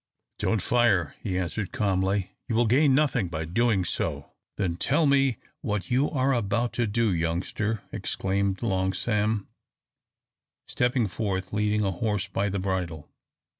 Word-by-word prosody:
"Don't 110 -3 0
fire," 105 - +2
he 90 - -2
answered, 95 +2 -2
calmly, 95 -1 0 0.2
"you 115 - -1
will 120 +1 +4
gain 135 +4 +4
nothing 130 -9 +2
by 80 -2 -3
so - - -3
doing!" 100 +2 +1 0.7
"Then 90 -4 0
tell 150 - +2
me 135 -4 +3 0.2
what 105 -2 -3
you 135 +4 +3
are 135 -1 +1
about 120 +1 0
to 120 -2 0
do, 110 -1 +1
youngster," 90 +6 -1
exclaimed 95 +1 -1
Long 95 -3 +1
Sam, 105 0 0 1.2
stepping 125 -1 +1
forth, 95 -2 -3
leading 105 0 +1
a 95 - +1
horse 100 +1 -1
by 100 +1 -1
the 100 - -2
bridle. 90 -5 -3
105 Hz, 145 wpm, -27 LUFS, 95-120 Hz, 1.2 s, will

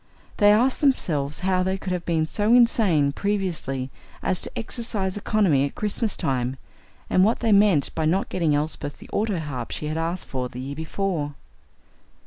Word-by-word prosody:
They 205 0 +6
asked 245 +5 +2
themselves 150 - +1
how 185 -1 +1
they 190 +1 0
could 185 -1 -4
have 175 -1 -3
been 160 -2 +1
so 210 +6 0
insane 200 -12 +4
previously 165 -9 -2 0.3
as 185 - 0
to - - -4
exercise 220 -5 -2
economy 200 -9 +2
at 140 - -3
Christmas 215 0 -1
time, 130 0 -1 0.5
and 185 - +3
what 220 +4 +2
they 230 -2 +2
meant 200 -8 +4
by 160 - -1
not 185 +5 +1
getting 160 -5 +1
Elsbeth 145 -1 -1
the - - -14
autoharp 160 - -2
she - - -5
had 155 +1 -2
asked 170 +2 -3
for 125 -2 -3
the 125 - -9
year 135 +2 -5
before. 160 -2 -3
175 Hz, 170 wpm, -24 LUFS, 145-205 Hz, 0.5 s, They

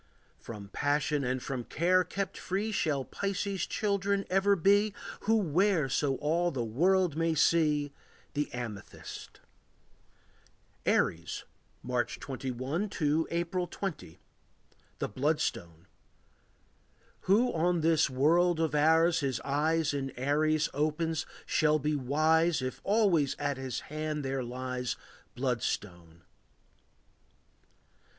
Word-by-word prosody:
From 105 -3 -9
passion 145 +3 0
and 130 0 -1
from 130 -3 -3
care 180 +8 +2
kept 190 +2 -4
free 200 +4 -2
Shall 145 -9 0
Pisces' 200 -1 -2
children 200 -1 0
ever 195 +2 +4
be 200 +3 +3 0.3
Who 225 +2 +4
wear 180 -4 +2
so 135 0 +1
all 165 +5 +1
the 130 -7 -2
world 175 - +2
may 165 0 +1
see 150 -2 +2 0.4
The 145 0 -2
amethyst. 115 -5 -8 1.5
Aries. - - +1 0.4
March 125 -1 -1
21 135 - -3
to 155 -3 0
April 175 +1 -1
20. 180 - -6 0.8
The - - -2
Bloodstone. 100 - -2 1.4
Who 235 +6 +4
on 170 +1 +1
this 160 -2 +3
world 160 +6 +3
of 160 -2 0
ours 160 +3 +4
his 135 -5 -1
eyes 150 +2 +1
In 135 -1 -2
Aries 150 +3 +2
opens 155 +2 -1 0.2
shall 155 0 +3
be 150 +1 -1
wise 155 +4 +2
If 130 - -4
always 195 -9 +2
on 145 -2 -1
his 130 -2 -4
hand 155 -1 -4
there 135 -1 -1
lies 125 0 -3
A - - -24
bloodstone. 90 -9 -3
155 Hz, 115 wpm, -30 LUFS, 135-175 Hz, 1.5 s, ever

